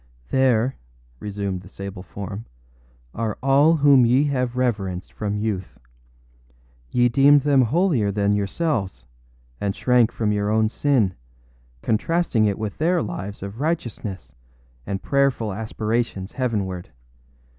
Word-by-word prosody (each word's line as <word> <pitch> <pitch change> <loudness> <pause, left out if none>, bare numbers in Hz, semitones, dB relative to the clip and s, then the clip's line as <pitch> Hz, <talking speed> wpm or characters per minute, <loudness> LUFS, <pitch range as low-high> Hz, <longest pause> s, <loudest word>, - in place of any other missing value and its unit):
âThere,â 130 -1 +3 0.5
resumed 100 -3 -4
the 95 - -14
sable 100 -2 -7
form, 100 +3 -7 0.7
âare 110 -2 -2
all 140 +4 +5
whom 140 -4 +6
ye 125 +4 +4
have 125 -4 -1
reverenced 100 -8 -2
from 105 -1 -3
youth. 105 -5 -3 1.1
Ye 120 0 +3
deemed 140 +4 +5
them 140 -1 +4
holier 130 - +2
than 100 0 +1
yourselves, 100 - -2 0.5
and 100 -1 -2
shrank 125 -3 +3
from 110 -2 -1
your 105 0 0
own 110 0 +2
sin, 120 -7 +1 0.7
contrasting 115 0 +1
it 100 -2 0
with 110 -2 -5
their 170 +3 +2
lives 105 - -6
of 100 +4 -7
righteousness 120 - -3 0.5
and 95 -1 -3
prayerful 140 -7 +1
aspirations 110 -1 -2
heavenward. 100 -8 -2
110 Hz, 125 wpm, -23 LUFS, 100-135 Hz, 1.1 s, whom